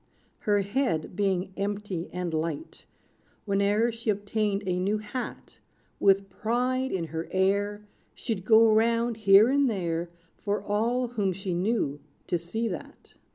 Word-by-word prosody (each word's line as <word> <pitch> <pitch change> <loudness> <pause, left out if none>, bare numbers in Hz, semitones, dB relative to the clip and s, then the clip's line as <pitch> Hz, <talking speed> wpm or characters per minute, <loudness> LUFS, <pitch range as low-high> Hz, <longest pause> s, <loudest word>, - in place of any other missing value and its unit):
Her 205 -1 +2
head 195 - -1
being 190 -1 0
empty 200 -3 -3
and 180 -2 -3
light, 165 - -4 0.6
Whene'er 205 +3 +2
she 230 0 -5
obtained 205 0 0
a 180 -1 0
new 200 +4 +1
hat, 215 +4 -7 0.4
With 195 0 +4
pride 250 +5 -1
in 185 -3 -1
her 160 0 -4
air, 200 +2 0 0.3
She'd 220 -7 -3
go 220 +1 +6
round, 230 +1 +2
here 200 0 +7
and 275 0 +3
there, 170 -5 -2 0.3
For 205 0 -1
all 235 +5 0
whom 205 -5 0
she 190 0 -4
knew 175 -6 0 0.3
to 175 - -1
see 220 +8 -3
that. 180 - -9
205 Hz, 140 wpm, -27 LUFS, 185-225 Hz, 0.6 s, here